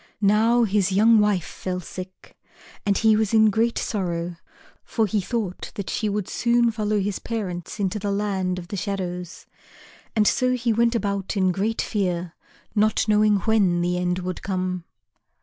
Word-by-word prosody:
Now 225 +4 +4
his 200 -3 +1
young 220 +3 +5
wife 205 -4 +2
fell 180 -1 -4
sick, 185 +2 -10 0.5
and 200 - +3
he 220 -1 +4
was 220 0 +1
in 220 -1 +6
great 230 +3 +1
sorrow, 175 -4 -2 0.5
for 225 - 0
he 210 0 0
thought 205 -3 -4
that 200 - -4
she 215 - -1
would 205 -2 -2
soon 235 0 +2
follow 215 -1 0
his 200 0 -2
parents 195 -4 -5
into 200 +1 -1
the 205 0 -3
Land 195 -3 -1
of 175 -1 -8
the 200 - -4
Shadows. 180 -3 -4 0.7
And 210 -2 +3
so 255 -1 +2
he 240 -2 0
went 235 +1 +2
about 200 -2 -2
in 185 -1 +3
great 205 +5 -1
fear, 180 -5 -2 0.4
not 215 +1 +2
knowing 210 -1 +3
when 195 -5 +2
the 180 +1 0
end 180 0 0
would 185 -1 -4
come. 185 -2 -2
200 Hz, 165 wpm, -24 LUFS, 185-220 Hz, 0.7 s, in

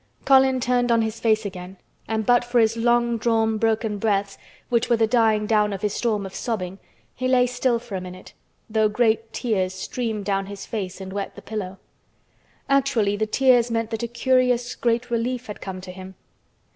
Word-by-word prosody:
Colin 265 -1 +5
turned 245 0 +1
on 230 -1 +3
his 220 0 -4
face 220 -1 +2
again 185 -1 -7 0.3
and 220 -1 -1
but 245 +1 +4
for 240 0 -1
his 225 0 +3
long 235 0 +2
drawn 225 -1 +1
broken 220 -2 0
breaths, 200 -2 0 0.3
which 235 -1 +1
were 235 - +4
the 225 - +3
dying 220 -2 +2
down 210 -1 +2
of 195 0 -5
his 205 -1 0
storm 215 -4 -1
of 190 - -8
sobbing, 195 -5 -4 0.3
he 255 - -2
lay 255 -1 +4
still 245 0 0
for 230 -2 -11
a 190 - -2
minute, 185 0 -10 0.3
though 220 -1 +2
great 225 0 +1
tears 190 -7 -1
streamed 220 +1 -4
down 195 -1 -1
his 200 -1 -8
face 195 -5 -5
and 190 0 -7
wet 200 -1 -4
the - - -9
pillow. 195 -3 -5 0.9
Actually 265 -7 +2
the 215 +1 -1
tears 245 0 +3
meant 230 -1 -2
that 225 - -3
a 235 - -2
curious 250 0 +1
great 240 0 -1
relief 245 +2 -1
had 210 - -8
come 190 -1 -6
to 185 0 -9
him. 190 +1 -10
225 Hz, 195 wpm, -23 LUFS, 205-240 Hz, 0.9 s, Colin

